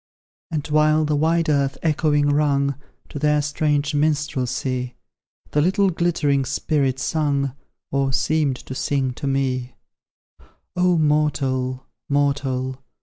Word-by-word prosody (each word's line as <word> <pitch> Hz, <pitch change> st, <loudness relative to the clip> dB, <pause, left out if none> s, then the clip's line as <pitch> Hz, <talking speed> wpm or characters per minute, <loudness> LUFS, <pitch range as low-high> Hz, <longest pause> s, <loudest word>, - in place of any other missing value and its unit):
And, 155 Hz, -3 st, -3 dB
while 155 Hz, 0 st, +3 dB
the 150 Hz, 0 st, 0 dB
wide 165 Hz, +3 st, +2 dB
earth 140 Hz, -2 st, +1 dB
echoing 150 Hz, -2 st, +2 dB
rung 140 Hz, -1 st, +2 dB, 0.4 s
To 145 Hz, -, -6 dB
that 150 Hz, 0 st, +2 dB
strange 150 Hz, 0 st, 0 dB
minstrelsy 135 Hz, -4 st, -1 dB, 0.6 s
The 150 Hz, -, +2 dB
little 190 Hz, +4 st, +2 dB
glittering 160 Hz, -5 st, +1 dB
spirits 135 Hz, 0 st, -1 dB
sung, 140 Hz, -4 st, 0 dB, 0.4 s
Or 135 Hz, -1 st, +1 dB
seemed 150 Hz, 0 st, +1 dB
to 130 Hz, -, -9 dB
sing, 135 Hz, -1 st, -1 dB
to 140 Hz, -, -5 dB
me: 130 Hz, -2 st, -1 dB, 1.0 s
"O 180 Hz, -1 st, +3 dB
mortal! 135 Hz, -4 st, 0 dB, 0.2 s
mortal! 135 Hz, -2 st, 0 dB
145 Hz, 115 wpm, -22 LUFS, 135-155 Hz, 1.0 s, while